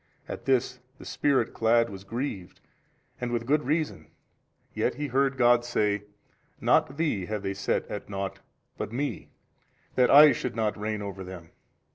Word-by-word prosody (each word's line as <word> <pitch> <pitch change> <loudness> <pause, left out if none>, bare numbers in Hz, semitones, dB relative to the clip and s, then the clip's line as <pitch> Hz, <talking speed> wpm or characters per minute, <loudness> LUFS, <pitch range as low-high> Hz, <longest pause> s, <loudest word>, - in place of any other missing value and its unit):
At 120 - -7
this 130 -1 +1 0.2
the - - -12
Spirit 135 -5 +1
clad 115 0 +3
was 95 -1 -9
grieved 110 -3 -5 0.6
and 125 -1 -2
with 120 -1 -1
good 145 +4 +2
reason, 155 +1 -1 0.7
yet - - 0
he 150 - -3
heard 135 0 +1
God 120 -1 +5
say, 105 -4 0 0.5
Not 135 - +2
thee 130 - -1
have 105 -2 -3
they 95 0 -2
set 100 +1 -1
at 105 - -6
nought 95 -1 -4 0.4
but 105 0 -4
Me 140 +5 -3 0.6
that 125 -1 +3
I 150 +1 +9
should 125 -3 -3
not 110 -2 0
reign 105 0 -3
over 100 -1 -6
them. 90 -3 -10
115 Hz, 160 wpm, -27 LUFS, 100-135 Hz, 0.7 s, I